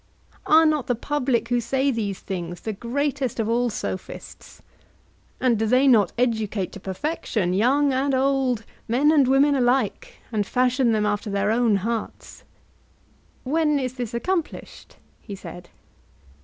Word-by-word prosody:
Are 320 +1 +6
not 305 -4 +1
the 245 - +1
public 250 -2 -1
who 245 -1 +1
say 265 +4 0
these 205 -5 -3
things 175 -2 -5
the 220 - -4
greatest 265 +3 -2
of 220 - 0
all 240 +2 +1
Sophists? 185 -3 -7 0.8
And 240 -4 +2
do 220 - 0
they 255 +4 +4
not 215 -8 +4
educate 220 -5 -1
to - - -9
perfection 195 - -2
young 270 +8 +2
and 270 +1 +1
old, 260 -3 +1 0.2
men 270 +7 +3
and 285 -5 +4
women 275 +2 +4
alike, 265 - 0 0.2
and 215 -2 0
fashion 250 +3 +1
them 215 -1 +1
after 210 +1 -1
their 200 +1 0
own 230 -2 +2
hearts? 220 +3 -4 1.0
When 300 +2 +1
is 255 -2 -2
this 245 -3 -5
accomplished? 340 +6 -4 0.3
he 205 - -8
said. 175 -2 -10
245 Hz, 145 wpm, -23 LUFS, 215-275 Hz, 1.0 s, Are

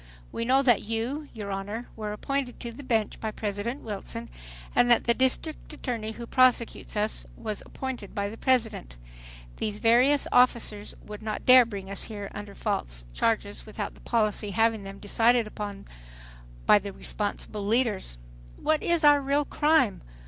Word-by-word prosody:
We 230 - -3
know 265 +3 +4
that 245 -5 +4
you, 235 +7 -3
your 205 -3 -6
Honor, 205 +5 -4
were 215 -2 -4
appointed 260 +4 -3
to 235 - -5
the 235 - -10
bench 225 -6 0
by 220 - -2
President 215 +4 -4
Wilson, 195 - -6 0.4
and 245 - +4
that 240 - +5
the 235 - +3
district 260 +7 0
attorney 230 -7 -4
who 235 +1 -7
prosecutes 250 -3 +2
us 210 +1 0
was 215 -2 -4
appointed 260 -7 -6
by 200 0 -1
the 210 - -7
President. 225 - 0 0.6
These 210 -1 -2
various 245 +6 +4
officers 235 -4 +2
would 210 0 -8
not 215 -1 -4
dare 255 -1 +9
bring 200 -3 -7
us 195 - -1
here 205 -3 -6
under 205 -1 -8
these - - -17
false - - -2
charges - - -1
without - - -5
the - - -18
policy 215 -2 0
having 225 +1 +1
been 195 0 -8
decided 230 +3 +3
upon 205 -2 -6 0.8
by 210 - +7
the 200 0 -6
responsible 205 +1 -4
leaders. 215 - 0 0.4
"What 310 -1 +1
is 340 -1 +1
our 290 -1 +7
real 280 +2 +1
crime? 295 - +2
225 Hz, 165 wpm, -27 LUFS, 205-250 Hz, 0.8 s, dare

